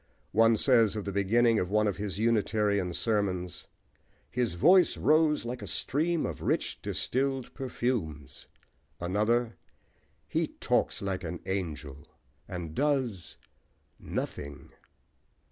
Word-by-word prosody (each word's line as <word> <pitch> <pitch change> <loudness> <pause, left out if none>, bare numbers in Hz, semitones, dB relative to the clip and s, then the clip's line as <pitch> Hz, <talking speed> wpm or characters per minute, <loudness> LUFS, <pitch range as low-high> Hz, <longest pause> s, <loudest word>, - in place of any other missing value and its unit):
One 115 0 +5
says, 115 -4 +4
of 105 - -4
the 100 - -2
beginning 110 +4 +3
of 90 - -2
one 105 +1 +2
of 100 -3 -1
his 100 -2 -4
Unitarian 105 -4 +1
sermons: 90 -2 -1 0.6
"His 120 -7 -1
voice 180 - +5
rose 155 -2 +3
like 120 +1 -4
a - - -6
stream 160 +4 0
of - - -5
rich, - - -1
distilled 135 0 -1
perfumes;" 115 - -3 0.5
another, 110 +6 0 0.7
"He - - 0
talks - - -1
like 95 -2 -2
an 85 0 -5
angel, 75 -7 -4 0.4
and 85 -5 -6
does 130 - -1 0.6
nothing!" 70 +2 -5
105 Hz, 115 wpm, -29 LUFS, 90-120 Hz, 0.7 s, One